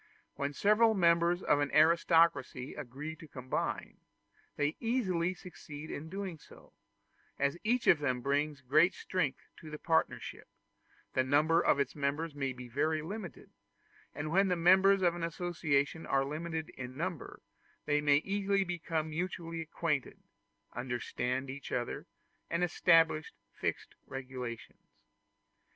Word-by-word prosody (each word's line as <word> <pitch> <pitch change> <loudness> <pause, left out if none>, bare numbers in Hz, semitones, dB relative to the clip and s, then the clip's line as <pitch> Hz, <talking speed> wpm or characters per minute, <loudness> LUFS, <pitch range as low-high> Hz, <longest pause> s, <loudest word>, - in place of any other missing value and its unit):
When 140 0 -2
several 215 +7 +4
members 170 0 +3
of 145 - +3
an 145 0 0
aristocracy 160 -4 +3
agree 150 +3 -6
to 160 - -12
combine, 130 -2 -4 0.6
they 145 +1 0
easily 185 -7 0
succeed 155 -4 -9
in 155 +2 -6
doing 190 -3 -5
so; - - -17 0.6
as 140 +2 +1
each 240 +3 +1
of 160 - +6
them 130 -4 -1
brings 145 +2 0
great 155 +8 +4
strength 160 -8 -2
to 155 - -11
the 150 - -6
partnership, 160 +1 -1 0.7
the 130 - +2
number 155 +5 +3
of - - +3
its 140 - -1
members 145 +3 -1
may 135 -2 -2
be 125 -1 -9
very 155 +5 0
limited; 195 +1 -7 0.6
and 150 +2 -4
when 195 +3 +4
the 180 - +2
members 190 +3 +5
of 175 -1 +4
an 175 - -6
association 165 -3 -1
are 135 0 +2
limited 160 +2 -4
in 130 0 -8
number, 170 -2 -4 0.5
they 150 0 +2
may 145 -1 +5
easily 200 0 +1
become 165 -3 -3
mutually 165 0 -3
acquainted, 160 -3 -2 0.6
understand 125 +1 -2
each 135 +1 -7
other, 120 -1 -3 0.4
and 170 +1 0
establish 165 -2 +3 0.2
fixed - - -3
regulations. 125 -3 -7
155 Hz, 135 wpm, -32 LUFS, 140-175 Hz, 0.7 s, of